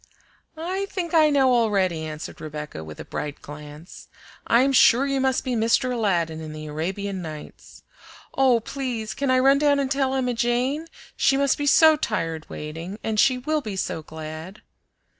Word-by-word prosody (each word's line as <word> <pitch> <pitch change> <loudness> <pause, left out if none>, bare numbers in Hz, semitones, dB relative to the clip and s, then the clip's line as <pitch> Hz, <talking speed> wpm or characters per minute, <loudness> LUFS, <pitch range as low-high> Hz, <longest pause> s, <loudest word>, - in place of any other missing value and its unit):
"I 375 +5 -3
think 365 -4 -4
I 310 -2 +5
know 270 -3 +3
already," 195 -8 +1
answered 155 0 -8
Rebecca, 150 - -7
with 75 -1 -10
a - - -7
bright 145 -1 -5
glance. 150 +3 -11 0.4
"I'm 260 +4 +4
sure 255 +1 +6
you 275 -1 0
must 265 -1 +1
be 255 - -2
Mr. 235 +3 +2
Aladdin 170 -8 0
in 155 -1 -7
the 155 0 -8
Arabian 185 +6 -4
Nights. 155 -3 -10 0.5
Oh, 260 -3 +4
please, 240 -4 -4
can 280 -1 -2
I 255 - +4
run 270 +2 +4
down 290 -1 +3
and 270 -1 -1
tell 270 -1 +1
Emma 250 -2 0
Jane? 245 +6 0 0.3
She 270 - +3
must 280 -1 +2
be 290 - -3
so 315 +1 +6
tired 165 - -3
waiting, 165 +6 -7
and 220 -1 -1
she 255 +1 +4
will 305 +4 -1
be 215 -7 -5
so 175 -3 -3
glad!" 160 +5 -9
230 Hz, 175 wpm, -24 LUFS, 160-270 Hz, 0.5 s, sure